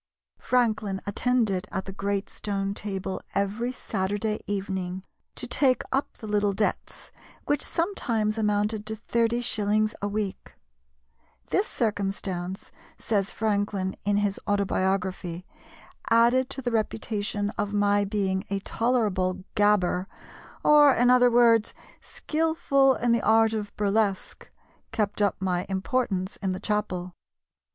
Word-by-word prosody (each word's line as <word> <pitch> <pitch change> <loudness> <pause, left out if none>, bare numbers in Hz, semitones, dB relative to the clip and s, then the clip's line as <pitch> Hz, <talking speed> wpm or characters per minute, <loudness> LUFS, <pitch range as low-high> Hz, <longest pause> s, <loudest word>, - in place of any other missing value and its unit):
Franklin 215 -6 +1
attended 210 -3 0
at 190 - -3
the 195 - -6
great 200 0 -2
stone 195 -1 -3
table 195 -2 -4
every 205 +5 0
Saturday 205 -2 -2
evening 190 -2 -3 0.3
to - - -5
take 260 -3 +2
up 270 +2 -1
the - - -9
little 205 -1 +1
debts, 210 +2 -3 0.3
which 290 -1 +1
sometimes 235 - 0
amounted 210 0 0
to 220 - -2
thirty 230 +2 0
shillings 215 -1 +1
a 205 - 0
week. 205 -1 -4 1.0
"This 400 +4 +2
circumstance," 195 -4 -3 0.3
says 200 -3 0
Franklin 205 -3 -1
in 205 0 +1
his 205 -1 0
autobiography, 190 -3 -1 0.6
"added 240 +3 +4
to 270 - -4
the 245 - -1
reputation 210 -2 -1
of 205 -1 -3
my 205 0 +2
being 195 -2 -1
a 200 - 0
tolerable 195 -6 0
gabber 195 -3 +2 0.6
or, 295 -1 +7
in 245 +1 +4
other 250 0 +6
words, 230 -2 +4 0.3
skilful 305 -4 +1
in 240 0 0
the 235 -1 +3
art 225 0 +4
of 210 -2 -3
burlesque 205 -1 -1 0.4
kept 210 -2 -1
up 205 -2 +2
my 180 -1 -1
importance 190 -1 -1
in 190 -2 -2
the 185 - -5
'chapel. 185 -4 -2
205 Hz, 125 wpm, -26 LUFS, 195-230 Hz, 1.0 s, or